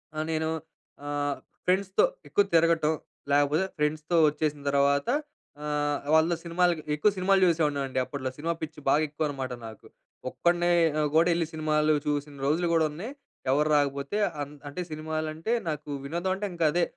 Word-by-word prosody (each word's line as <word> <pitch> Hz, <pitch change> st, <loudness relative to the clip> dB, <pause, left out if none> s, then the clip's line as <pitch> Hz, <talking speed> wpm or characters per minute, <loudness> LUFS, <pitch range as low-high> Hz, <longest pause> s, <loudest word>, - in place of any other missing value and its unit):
ఆహ్, 155 Hz, -, -1 dB
నేను 160 Hz, 0 st, 0 dB, 0.6 s
ఆహ్, 145 Hz, -1 st, -1 dB, 0.3 s
ఫ్రెండ్స్‌తో 190 Hz, -, +3 dB, 0.2 s
ఎక్కువ 205 Hz, -, +3 dB
తిరగటం. 160 Hz, -1 st, +3 dB, 0.4 s
లేకపోతే 145 Hz, +5 st, +3 dB
ఫ్రెండ్స్‌తో 150 Hz, +3 st, 0 dB
వచ్చేసిన 150 Hz, -1 st, -2 dB
తర్వాత 140 Hz, +2 st, +2 dB, 0.6 s
ఆహ్, 145 Hz, -1 st, 0 dB
వాళ్ళతో 160 Hz, +2 st, +4 dB
సినిమాలకి, 170 Hz, -1 st, +1 dB
ఎక్కువ 205 Hz, +8 st, +3 dB
సినిమాలు 190 Hz, +1 st, +3 dB
చూసేవాడిని 155 Hz, -4 st, +1 dB
అండి. 130 Hz, -1 st, -2 dB
అప్పట్లో 130 Hz, -3 st, -4 dB
సినిమా 165 Hz, +3 st, -1 dB
పిచ్చి 160 Hz, -1 st, -6 dB
బాగా 150 Hz, +3 st, +4 dB
ఎక్కువ 150 Hz, +1 st, -3 dB
అనమాట 135 Hz, -3 st, -4 dB
నాకు. 110 Hz, -, -12 dB, 0.4 s
ఒక్కడినే 175 Hz, +3 st, +1 dB, 0.3 s
ఆహ్, 150 Hz, -, +2 dB
గూడా 165 Hz, +2 st, +5 dB
వెళ్లి 165 Hz, -1 st, 0 dB
సినిమాలు 155 Hz, 0 st, +2 dB
చూసిన 145 Hz, 0 st, -2 dB
రోజులు 165 Hz, +4 st, +2 dB
గూడా 160 Hz, -1 st, +4 dB
ఉన్నాయి. 190 Hz, -, -6 dB, 0.4 s
ఎవరు 150 Hz, +3 st, +2 dB
రాకపోతే 140 Hz, +6 st, 0 dB, 0.2 s
అహ్, 145 Hz, 0 st, -5 dB
అంటే 160 Hz, +6 st, -5 dB
సినిమాలంటే, 155 Hz, +4 st, -3 dB, 0.2 s
నాకు 150 Hz, -1 st, -5 dB, 0.2 s
వినోదం 175 Hz, +5 st, -2 dB
అంటే 205 Hz, +2 st, -3 dB
ఇంకా 170 Hz, -2 st, 0 dB
అదే. 175 Hz, 0 st, +2 dB
155 Hz, 150 wpm, -27 LUFS, 145-170 Hz, 0.6 s, గూడా